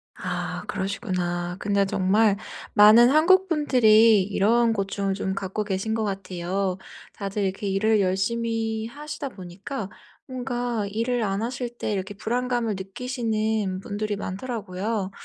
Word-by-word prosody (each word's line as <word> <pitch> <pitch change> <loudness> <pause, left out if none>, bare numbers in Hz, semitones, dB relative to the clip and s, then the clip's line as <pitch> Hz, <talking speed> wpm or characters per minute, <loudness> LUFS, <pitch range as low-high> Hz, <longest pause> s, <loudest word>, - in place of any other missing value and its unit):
아 180 0 -4
그러시구나. 180 -3 -2
근데 200 -1 +1
정말 195 +2 +2 0.4
많은 220 +4 +8
한국 370 +6 +5
분들이 230 - +5
이런 220 +4 +2
고충을 195 -1 -1
좀 190 -1 -2
갖고 195 +2 -3
계신 205 +2 -2
것 225 - -1
같아요. 190 -1 -2 0.4
다들 200 0 -3
이렇게 195 +2 -2
일을 210 +2 +2
열심히 225 +3 -1
하시다 290 +3 -6
보니까 195 +3 -7 0.4
뭔가 245 -4 -2
일을 230 +3 -1
안 195 0 -1
하실 240 0 -4
때 - - -2
이렇게 195 0 -3
불안감을 240 +1 -1
느끼시는 215 -2 -2
분들이 210 0 -3
많더라고요. 200 -1 -4
210 Hz, 290 characters per minute, -25 LUFS, 195-235 Hz, 0.4 s, 많은